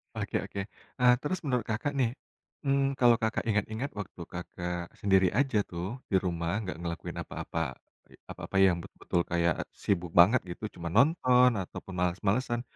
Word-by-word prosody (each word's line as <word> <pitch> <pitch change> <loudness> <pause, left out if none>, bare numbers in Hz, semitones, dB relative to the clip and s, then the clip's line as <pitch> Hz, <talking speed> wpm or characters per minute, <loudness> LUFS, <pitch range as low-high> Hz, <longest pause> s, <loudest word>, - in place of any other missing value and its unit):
Oke - - -2
oke, 100 - -6 0.4
eee, 125 0 +7
terus 175 +5 -2
menurut 125 -7 -1
Kakak 110 +6 -1
nih, 125 -4 +3 0.6
mmm, 135 0 +2
kalau 120 -2 +6
Kakak 110 0 0
ingat-ingat 110 +6 -1
waktu 95 -3 -7
Kakak 90 0 -5
sendiri 95 -2 +4
aja 135 -6 +2
tuh 90 +8 -4
di - - +3
rumah 85 -1 -1
nggak 90 -6 -5
ngelakuin 85 -1 -5
apa-apa, - - -5 0.7
apa-apa - - -8
yang 90 -3 +5
betul-betul 85 +1 -2
kayak 85 -1 +2 0.2
sibuk 90 -4 -1
banget 110 +8 +7
gitu 85 - -8
cuma 85 -1 -4
nonton 125 -2 +5
ataupun 95 +1 -8
males-malesan, 105 +7 0
100 Hz, 150 wpm, -29 LUFS, 90-125 Hz, 0.7 s, eee